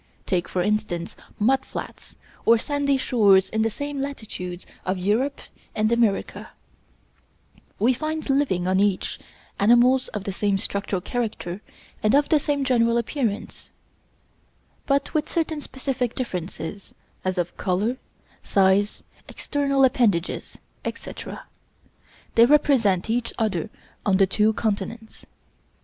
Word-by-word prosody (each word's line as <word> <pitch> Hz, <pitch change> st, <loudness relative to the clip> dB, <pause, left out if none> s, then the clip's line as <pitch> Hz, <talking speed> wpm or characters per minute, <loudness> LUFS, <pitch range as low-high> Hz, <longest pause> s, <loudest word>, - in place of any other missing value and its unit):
Take, 180 Hz, -2 st, 0 dB
for 180 Hz, -, 0 dB
instance, 210 Hz, -5 st, -1 dB, 0.2 s
mud 265 Hz, +5 st, +2 dB
flats -, -, -8 dB, 0.3 s
or 230 Hz, -, +6 dB
sandy 280 Hz, +2 st, 0 dB
shores 200 Hz, -7 st, +4 dB
in 220 Hz, -, 0 dB
the 225 Hz, -, +2 dB
same 285 Hz, +4 st, -4 dB
latitudes 205 Hz, -10 st, -6 dB, 0.2 s
of 185 Hz, +1 st, -1 dB
Europe 220 Hz, +10 st, 0 dB, 0.3 s
and 215 Hz, +1 st, +1 dB
America: 230 Hz, -4 st, 0 dB, 1.3 s
we 240 Hz, +5 st, +3 dB
find 310 Hz, +4 st, -3 dB
living 270 Hz, -11 st, +1 dB
on 185 Hz, 0 st, +2 dB
each, 200 Hz, -2 st, 0 dB, 0.4 s
animals 240 Hz, +5 st, +5 dB
of 205 Hz, -, -5 dB
the 195 Hz, -, -4 dB
same 200 Hz, 0 st, +1 dB
structural 200 Hz, -1 st, -2 dB
character 210 Hz, -6 st, -3 dB, 0.4 s
and 215 Hz, +4 st, +3 dB
of 290 Hz, 0 st, +3 dB
the 310 Hz, -, +5 dB
same 285 Hz, -1 st, -1 dB
general 235 Hz, -3 st, +3 dB
appearance, 235 Hz, -3 st, -3 dB, 1.2 s
but 280 Hz, 0 st, +1 dB
with 305 Hz, -1 st, 0 dB
certain 320 Hz, -2 st, -1 dB
specific 260 Hz, -3 st, -3 dB
differences, 185 Hz, -4 st, -5 dB, 0.3 s
as 185 Hz, 0 st, -1 dB
of 175 Hz, -1 st, -2 dB
color, 210 Hz, +6 st, 0 dB, 0.4 s
size, 195 Hz, +1 st, +2 dB, 0.3 s
external 275 Hz, -2 st, +1 dB
appendages, 210 Hz, -9 st, 0 dB, 0.3 s
etc. -, -, -6 dB, 0.9 s
They 230 Hz, +1 st, +7 dB
represent 250 Hz, -, +3 dB
each 230 Hz, +1 st, -1 dB
other 210 Hz, -3 st, -1 dB, 0.3 s
on 195 Hz, -2 st, +3 dB
the 195 Hz, -, +5 dB
two 210 Hz, +3 st, +2 dB
continents. 220 Hz, +1 st, -4 dB
220 Hz, 125 wpm, -24 LUFS, 195-265 Hz, 1.3 s, They